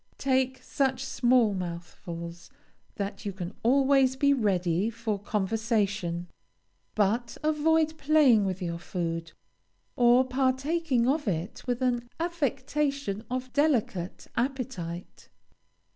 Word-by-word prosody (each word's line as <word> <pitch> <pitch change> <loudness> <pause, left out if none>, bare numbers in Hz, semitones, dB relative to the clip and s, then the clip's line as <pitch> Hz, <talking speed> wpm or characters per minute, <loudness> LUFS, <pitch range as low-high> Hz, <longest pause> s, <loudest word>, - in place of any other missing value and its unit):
Take 260 -1 0
such 265 -2 0
small 245 -4 +3
mouthfulls 170 -1 -6 0.5
that 200 0 -4
you 205 - -2
can 185 0 -6
always 265 +1 +4
be 280 +1 +3
ready 190 -5 +1
for 225 -3 -3
conversation, 200 -4 -1 0.7
but 225 +3 +1
avoid 315 +1 +2
playing 280 -7 +5
with 190 -1 -2
your 170 -1 -3
food, 165 -2 -4 0.6
or 245 +1 +5
partaking 265 +1 +1
of 295 0 +1
it 175 +1 -2
with 250 +1 -1
an 240 -1 0
affectation 280 - -1
of 255 0 -4
delicate 245 - 0
appetite. 235 -10 -4
240 Hz, 105 wpm, -28 LUFS, 190-270 Hz, 0.7 s, playing